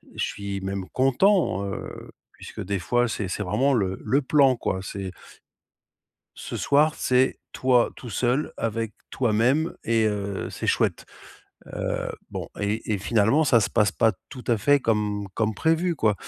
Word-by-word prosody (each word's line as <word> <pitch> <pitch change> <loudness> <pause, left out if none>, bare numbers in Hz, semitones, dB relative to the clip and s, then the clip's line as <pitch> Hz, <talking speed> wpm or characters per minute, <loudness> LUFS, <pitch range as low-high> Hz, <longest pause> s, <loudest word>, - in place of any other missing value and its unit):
je - - -1
suis 100 -1 -4
même 95 -1 -4
content, 135 - +2
heu, 100 -1 -7 0.2
puisque - - -8
des 100 +1 -2
fois 120 +7 +1
c'est 105 -3 -3
c'est 100 +3 -3
vraiment 115 +9 +1
le 95 -6 0
le 135 +6 +2
plan 135 -1 +4
quoi, 95 -5 -2
c'est 95 0 -5 1.2
ce - - -6
soir, 150 +2 +3
c'est 130 +1 +2
toi 125 -2 +2
tout 125 - -9
seul 125 +7 0
avec 115 -1 -2 0.2
toi-même 125 +7 +1
et 115 -1 +2
heu, 100 -2 -3
c'est - - -6
chouette. - - +1 0.6
Heu, - - -3 0.2
bon - - -5
et 105 +2 -1
et 105 - 0
finalement 110 +8 +2
ça 130 -5 +5
se 100 - +1
passe 105 -3 +3
pas 115 +1 +2 0.2
tout 125 -3 -10
à 120 - +3
fait 145 +7 +4
comme 105 -4 -1
comme 110 -1 0
prévu 165 - +1
quoi. 110 -6 +2
115 Hz, 160 wpm, -25 LUFS, 100-130 Hz, 1.2 s, ça